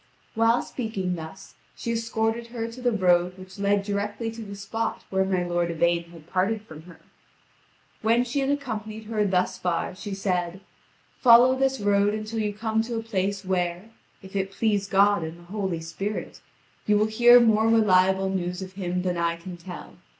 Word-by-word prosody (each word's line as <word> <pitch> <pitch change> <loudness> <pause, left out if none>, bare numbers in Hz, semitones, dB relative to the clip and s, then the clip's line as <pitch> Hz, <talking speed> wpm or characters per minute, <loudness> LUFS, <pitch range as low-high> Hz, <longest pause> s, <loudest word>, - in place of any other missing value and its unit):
While 230 +1 +3
speaking 205 -7 -3
thus, 165 +3 -9 0.2
she 235 - -4
escorted 230 0 -1
her 230 -1 -4
to 250 +2 -10
the 245 -1 +2
road 180 -3 +2
which 185 +1 -12
led 200 0 +2
directly 205 +3 -3
to 230 0 -9
the 200 -2 -7
spot 205 +3 -3
where 190 0 +2
my 185 -2 0
lord 175 -1 0
Yvain 170 +1 +1
had 170 -2 -15
parted 195 +5 0
from 155 -7 -11
her. 180 -2 -15 1.0
When 230 +2 +3
she 250 +3 -2
had 270 0 0
accompanied 220 -6 -3
her 215 -1 -1
thus 185 -1 0
far, 175 0 -1
she 195 +2 -6
said: 180 -1 -2 0.6
"Follow 245 +1 +7
this 270 -1 +1
road 205 0 +2
until 215 +1 -4
you 210 -1 0
come 220 +1 -1
to 230 +1 -4
a 225 - -3
place 200 -2 -2
where, 180 +2 -2 0.3
if 190 +1 -12
it 195 -1 0
please 205 -1 0
God 200 -1 +4
and 160 +1 -6
the 175 - -16
Holy 190 -6 -2
Spirit, 180 +6 -5 0.5
you 210 0 +4
will 210 - +3
hear 240 +3 +7
more 220 -2 +4
reliable 190 -4 +4
news 180 0 -3
of 185 0 -10
him 180 -2 -2
than 180 -1 -1
I 170 0 0
can 175 +2 -9
tell. 175 +1 -10
200 Hz, 185 wpm, -25 LUFS, 180-225 Hz, 1.0 s, Follow